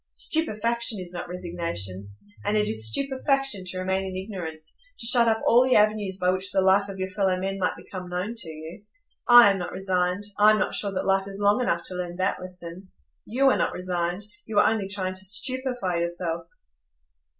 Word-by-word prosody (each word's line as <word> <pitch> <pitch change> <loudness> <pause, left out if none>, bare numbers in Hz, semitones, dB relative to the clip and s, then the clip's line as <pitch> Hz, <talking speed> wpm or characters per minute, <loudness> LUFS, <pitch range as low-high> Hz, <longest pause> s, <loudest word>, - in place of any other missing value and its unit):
Stupefaction 235 -6 0
is 180 -1 -4
not 175 0 -6
resignation; 170 - -3 0.3
and 215 - 0
it 210 - +1
is 110 0 +2
stupefaction 270 - 0
to 185 +1 -5
remain 190 +1 -1
in 190 -1 -6
ignorance,—to 185 - -6
shut 240 0 +6
up 220 -1 +1
all 240 +2 +5
the 255 0 +2
avenues 210 -2 +2
by 180 -1 +1
which 190 +2 -1
the - - +1
life 195 +1 +3
of 195 - -7
your 190 0 -4
fellow 190 -1 0
men 195 +1 -3
might 180 - 0
become 180 -2 -9
known 180 +5 -3
to 205 -8 -6
you. 160 +4 -10 0.4
I 240 -4 +9
am 195 - -2
not 180 - -5
resigned; 185 0 0 0.2
I 210 +1 +7
am - - +2
not 190 - -1
sure 200 - -1
that 190 - -3
life 195 0 +1
is 195 0 -8
long 205 +4 +3
enough 170 -8 0
to - - -6
learn 180 -1 -5
that 185 0 -1
lesson. 180 0 -8 0.4
You 265 +4 +2
are - - +1
not - - 0
resigned; 180 +1 -3 0.2
you 220 -2 -4
are - - +6
only 220 -3 0
trying 190 -2 -3
to 185 0 -2
stupefy 245 -3 +1
yourself." 170 -1 -3
190 Hz, 200 wpm, -25 LUFS, 180-215 Hz, 0.4 s, I